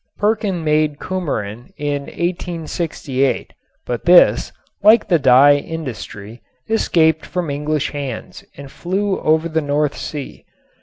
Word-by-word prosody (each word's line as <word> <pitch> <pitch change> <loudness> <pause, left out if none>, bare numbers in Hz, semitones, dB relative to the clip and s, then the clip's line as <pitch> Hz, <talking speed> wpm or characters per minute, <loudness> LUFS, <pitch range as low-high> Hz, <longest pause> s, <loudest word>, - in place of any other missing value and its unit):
Perkin 205 -4 0
made 150 -1 +1
cumarin 125 - -4
in 145 -1 -2
1868, 165 -6 -2 0.3
but 120 -1 -4
this, 175 0 +5 0.3
like 215 +2 +5
the 170 -4 +3
dye 140 +2 +6
industry, 125 - -7 0.3
escaped 160 -8 +2
from 175 -5 -3
English 150 +1 -2
hands 140 -5 -6
and 140 -1 -10
flew 195 +2 -2
over 160 +1 +2
the 160 -1 -1
North 145 0 0
Sea. 145 -3 -7
155 Hz, 115 wpm, -19 LUFS, 140-175 Hz, 0.3 s, dye